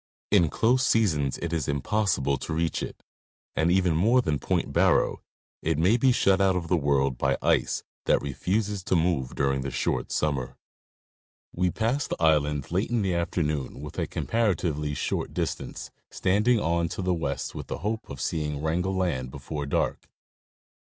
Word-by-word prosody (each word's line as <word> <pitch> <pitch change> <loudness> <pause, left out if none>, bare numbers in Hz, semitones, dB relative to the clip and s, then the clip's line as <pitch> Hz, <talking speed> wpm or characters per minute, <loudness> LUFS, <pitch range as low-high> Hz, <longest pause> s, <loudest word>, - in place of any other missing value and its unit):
In 90 -6 +5
close 125 +8 +2
seasons 80 - +2
it 85 0 -2
is 80 -5 -1
impossible 70 -1 +1
to 80 - -5
reach 80 +1 -1
it, - - -7 0.5
and, 80 +2 +2
even 90 -3 +3
more 110 +10 +4
than 75 - 0
Point - - -1
Barrow, - - +3 0.4
it - - 0
may 90 +8 +4
be 130 +2 +4
shut 100 -5 +3
out 95 -1 +3
of 85 -2 -3
the 90 - +4
world 70 -4 +1
by 70 0 +1
ice - - +1 0.2
that - - +4
refuses 95 - -2
to - - +1
move 80 -7 0
during 70 -1 +1
the 70 - -3
short - - -1
summer. 70 -5 -1 1.0
We 90 +1 +1
passed 115 - -1
the - - -3
island 75 -3 +2
late 95 +4 0
in 120 -3 +1
the 95 -2 0
afternoon 75 -6 -1
within 75 -1 -4
a - - -11
compara 115 -4 0
tively 75 -3 -2
short - - -2
distance, - - -4 0.2
standing 105 +5 +2
on 85 -2 0
to 95 - -4
the 90 0 +1
west 70 -5 -3
with - - -7
the - - -4
hope 110 +1 -2
of 70 - -7
seeing 75 -1 -2
Wrangel 90 +5 -1
land 80 -9 -1
before 70 +2 -5
dark. - - -1
85 Hz, 175 wpm, -26 LUFS, 70-95 Hz, 1.0 s, In